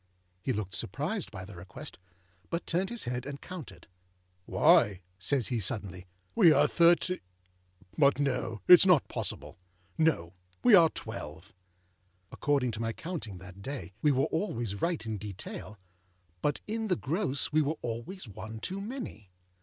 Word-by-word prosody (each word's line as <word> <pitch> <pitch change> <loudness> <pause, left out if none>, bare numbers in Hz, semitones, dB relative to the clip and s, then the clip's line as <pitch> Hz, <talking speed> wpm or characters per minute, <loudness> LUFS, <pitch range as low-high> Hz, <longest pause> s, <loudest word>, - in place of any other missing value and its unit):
â - - -41 0.4
He 130 - -1
looked 105 -5 -3
surprised 150 - -2
by 95 -3 -8
the 100 - -11
request, 95 - -9 0.5
but 170 0 -2
turned 180 +3 0
his 235 -1 -1
head 125 0 -3
and 140 0 -6
counted. 180 -5 -9 0.6
âWhy,â 100 -2 +5 0.2
says 120 +5 +1
he, 120 - 0
suddenly, 95 -3 -2 0.3
âwe 165 -3 +7
are - - +6
Thirtâ; 175 +2 +4 0.8
but 140 -1 +5
no, 125 -6 -1
itâs 180 +2 +9
not 175 -7 +5
possible. - - -5 0.4
No. 140 - +2 0.3
We 245 - +6
are 170 -5 +8
twelve.â 95 - -8 0.8
According 140 -4 +1
to 110 - -6
my 115 0 -1
counting 150 - -6
that 95 +1 -12
day, 130 -3 -6
we 150 - +4
were 135 +1 +2
always 120 - -2
right 165 -9 0
in 110 -2 -3
detail, 105 +1 -7 0.6
but 145 - 0
in 220 +1 -2
the 185 - +2
gross 150 -2 -1
we 155 +1 +4
were 150 +2 -1
always 120 - -5
one 110 +2 -8
too 190 - -4
many. 210 - -7
130 Hz, 155 wpm, -30 LUFS, 105-170 Hz, 0.8 s, itâs